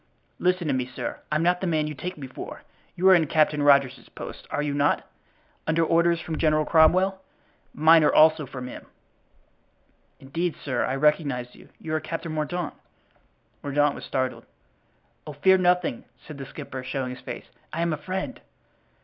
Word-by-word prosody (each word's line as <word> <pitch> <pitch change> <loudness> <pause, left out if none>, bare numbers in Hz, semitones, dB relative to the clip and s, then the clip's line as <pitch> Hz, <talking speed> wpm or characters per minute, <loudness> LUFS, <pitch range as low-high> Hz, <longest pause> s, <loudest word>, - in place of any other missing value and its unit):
"Listen 180 -1 +1
to 145 - 0
me, 130 -1 -1
sir. 130 - -5
I'm 155 +2 +1
not 180 +1 +2
the 190 - -1
man 155 -2 +1
you 150 - -4
take 180 +5 -6
me 140 - -7
for; 130 - -9 0.3
you 185 +2 +2
are - - +9
in 165 -4 +4
Captain 150 -1 +2
Rogers's 140 -3 +3
post, - - -9
are 145 - -1
you 145 -1 -2
not? 145 +1 +1 0.6
under 165 +1 +2
orders 170 +1 +3
from 160 -1 -5
General 155 -1 +2
Cromwell. 185 +5 +4 0.5
Mine, 160 +1 +5
also, 155 0 +5
are - - -15
from 130 -1 -7
him!" - - -10 1.3
"Indeed, 165 +5 -3
sir, 130 - 0
I 130 - -1
recognize 135 -4 +1
you; - - -17
you 155 - -5
are 155 - +1
Captain 165 +1 -5
Mordaunt." 155 +2 -3 0.9
Mordaunt 145 0 +1
was - - -9
startled. 130 -1 -3 0.8
"Oh, 150 - -6
fear 190 +7 +4
nothing," 180 -7 +1 0.2
said 150 -3 -9
the 135 - -7
skipper, 135 -3 -7
showing 130 -1 -3
his 125 - -10
face. - - -7 0.3
"I 165 +2 -1
am 170 -1 0
a - - -2
friend." 185 +5 -5
155 Hz, 175 wpm, -25 LUFS, 140-170 Hz, 1.3 s, are